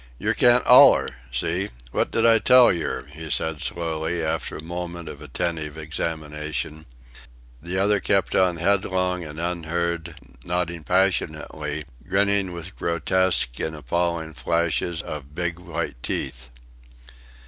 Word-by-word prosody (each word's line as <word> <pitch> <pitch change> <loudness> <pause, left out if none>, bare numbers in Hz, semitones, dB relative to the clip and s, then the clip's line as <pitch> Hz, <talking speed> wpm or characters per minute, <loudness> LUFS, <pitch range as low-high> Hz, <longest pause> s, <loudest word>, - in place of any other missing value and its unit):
"Yer - - 0
can't 125 0 +4
oller. - - +7 0.2
See? 85 +10 0 0.2
What - - 0
did 115 - +1
I 115 -1 +6
tell 125 -2 +6
yer?" 85 -5 -3
he 80 +1 -8
said, 80 0 -1
slowly, 80 0 -2
after 80 - -2
a 75 - -9
moment 85 0 -6
of 70 - -9
attentive 80 +1 -3
examination. 75 -1 -4 0.7
The 85 +3 -2
other 100 +1 +3
kept 95 0 +1
on 90 -2 +3
headlong 90 0 +1
and 75 0 -8
unheard, 85 0 -2 0.3
nodding 85 -2 -2
passionately, 80 -5 0 0.2
grinning 100 -1 +3
with 85 +2 -7
grotesque 85 -5 +1
and 80 - -3
appalling 85 0 -2
flashes 85 +1 -1
of 75 -1 -8
big 85 0 -2
white 85 -7 -5
teeth. 65 +1 -3
85 Hz, 125 wpm, -24 LUFS, 80-90 Hz, 0.7 s, oller